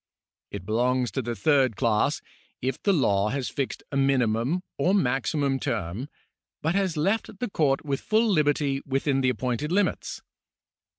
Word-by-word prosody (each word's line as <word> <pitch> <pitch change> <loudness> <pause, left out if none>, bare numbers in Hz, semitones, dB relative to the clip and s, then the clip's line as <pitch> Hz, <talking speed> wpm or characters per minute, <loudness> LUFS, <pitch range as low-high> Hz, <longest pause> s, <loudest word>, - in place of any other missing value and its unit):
It 90 - -7
belongs 125 +3 +1
to 135 - -2
the 120 -1 -4
third 135 -5 +3
class, 110 0 +1 0.4
if 130 0 -3
the 200 - +3
law 105 - +2
has 135 0 -2
fixed 135 -2 -3
a 140 - -1
minimum 135 +4 +1 0.2
or 190 +3 +3
maximum 135 -2 +1
term, 100 - -3 0.5
but 160 +2 +1
has 190 -4 0
left 200 +6 0
the 245 0 -4
court 145 -3 +1
with 140 -2 -2
full 220 +2 +2
liberty 145 -6 +1
within 135 0 0
the 130 - +3
appointed 125 +4 -2
limits. 200 +3 0
135 Hz, 155 wpm, -26 LUFS, 125-155 Hz, 0.5 s, third